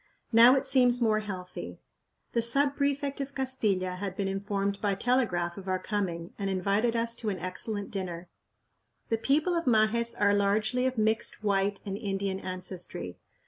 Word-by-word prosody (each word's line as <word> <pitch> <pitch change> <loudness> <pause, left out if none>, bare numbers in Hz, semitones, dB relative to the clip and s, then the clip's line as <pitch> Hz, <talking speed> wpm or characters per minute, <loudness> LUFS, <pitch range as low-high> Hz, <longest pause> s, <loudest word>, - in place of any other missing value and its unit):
Now 235 +3 +8
it 270 - 0
seems 250 -2 +4
more 220 -3 +2
healthy. 190 -4 -7 0.5
The 235 - +2
sub 275 +5 +3
prefect 280 0 -1
of 275 0 -6
Castilla 205 -9 -1
had 195 -1 -4
been 200 - -1
informed 200 0 -2
by 200 -2 +1
telegraph 190 -7 0
of 195 - -11
our 185 0 +1
coming, 185 -4 -3
and 200 -1 -1
invited 200 +5 +1
us 230 0 0
to 220 - -2
an 195 - -2
excellent 200 +3 -3
dinner. 180 -3 -5 0.8
The 225 - 0
people 300 +9 +2
of 335 -1 -1
Majes 235 0 +3
are 205 0 +4
largely 215 +5 +1
of 260 -1 -3
mixed 220 0 0
white 200 -1 +1
and 195 -1 -3
Indian 195 -1 -2
ancestry. 180 - -5
205 Hz, 165 wpm, -29 LUFS, 195-240 Hz, 0.8 s, Now